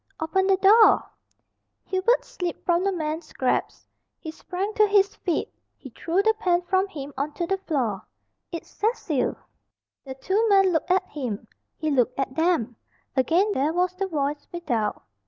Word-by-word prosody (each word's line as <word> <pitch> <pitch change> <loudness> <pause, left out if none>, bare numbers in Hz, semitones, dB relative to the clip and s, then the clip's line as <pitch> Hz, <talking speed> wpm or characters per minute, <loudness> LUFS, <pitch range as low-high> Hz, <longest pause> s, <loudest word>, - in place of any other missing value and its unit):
"Open 380 +4 +1
the 385 -1 +4
door!" 425 +4 +6 0.8
Hubert 390 +6 +1
slipped 355 -2 -5
from 345 0 +2
the 395 - +1
man's 315 -2 -4
grasp. 255 - -1 0.3
He 315 - -7
sprang 380 +6 -4
to 425 -1 +4
his 400 -1 +3
feet. 345 -5 -2 0.2
He 265 - -12
threw 345 +10 0
the 440 +1 +4
pen 360 -4 +1
from 375 +2 +1
him 290 -6 -8
on 285 +3 -3
to 345 - -2
the 385 +2 -1
floor. 245 - -2 0.4
"It's 335 - -6
Cecil!" 395 - -1 0.7
The 265 -1 -8
two 380 +11 0
men 390 -2 +5
looked 320 +2 -1
at 370 +1 +3
him. 245 -9 -5 0.3
He 310 -2 -1
looked 250 -3 +1
at 270 -1 -1
them. 290 -8 0 0.4
Again 335 - +2
there 300 -3 0
was 360 +1 +1
the 390 +1 -3
voice 290 -3 -2
without. 245 -12 -2
345 Hz, 165 wpm, -25 LUFS, 285-385 Hz, 0.8 s, door